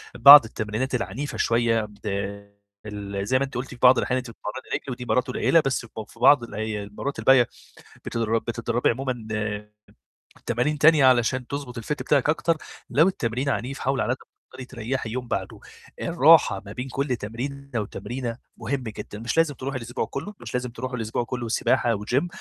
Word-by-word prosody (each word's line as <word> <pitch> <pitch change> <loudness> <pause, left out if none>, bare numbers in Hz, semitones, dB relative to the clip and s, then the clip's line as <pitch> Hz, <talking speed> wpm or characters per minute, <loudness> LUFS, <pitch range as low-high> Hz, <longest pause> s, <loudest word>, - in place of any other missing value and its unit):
بعض 140 -2 +10
التمرينات 110 +4 -3
العنيفة 130 +4 -4
شوية، 115 -1 +2
بد 105 +1 -11 0.8
ال 100 -1 -5
زي 130 - +3
ما 140 - +1
أنتِ 135 - -12
قُلتِ 125 +2 -3
في 125 - -10
بعض 130 0 +7
الأحيان 125 - 0
أنتِ 130 -2 -5
بتتمرّني 115 +3 -8
رِجل 135 - -5
ودي 125 0 -6
مرّات 125 +2 +1
قليّلة 160 +5 +3
بس 130 -3 -1
ب - - -16 0.2
في 115 - -18
بعض 130 0 +6
الأي 110 -2 -4
المرّات 105 +8 -5
الباقية 130 -3 +5 0.6
بتدر 115 -1 0
بتدرّبي 120 +1 -1
عمومًا 125 -2 -3
آآ 105 -1 -3 0.7
تمارين 125 +6 0
تانية 155 -2 +6
علشان 125 0 +3
تضبط 140 -4 -5
الfit 115 - -7
بتاعِك 145 -1 +1
أكتر، 165 +1 +1 0.3
لو 150 +8 +4
التمرين 130 -6 -1
عنيف 135 0 -2
حاولي 135 0 0
على 120 - 0
قد - - -7
ما - - -18 0.2
تقدري 130 0 -9
تريّحي 125 -1 -4
يوم 125 0 -4
بعده، - - -4 0.4
الراحة - - +5
ما - - -9
بين 125 +2 -5
كلّ 135 0 -1
تمرينة 135 +6 -6
وتمرينة 120 +3 -5 0.2
مهم 140 -1 -3
جدًا، 105 -2 -7
مش 115 +6 -3
لازم 165 -3 +3
تروحي 135 +1 -4
الأسبوع 120 0 -3
كلّه، 195 +10 -6
مش - - -8
لازم 125 0 -2
تروحي 125 +2 -5
الأسبوع 115 0 -2
كلّه 120 0 -4
سباحة 120 0 +1
وgym، 125 +10 0
125 Hz, 180 wpm, -24 LUFS, 115-135 Hz, 0.8 s, بعض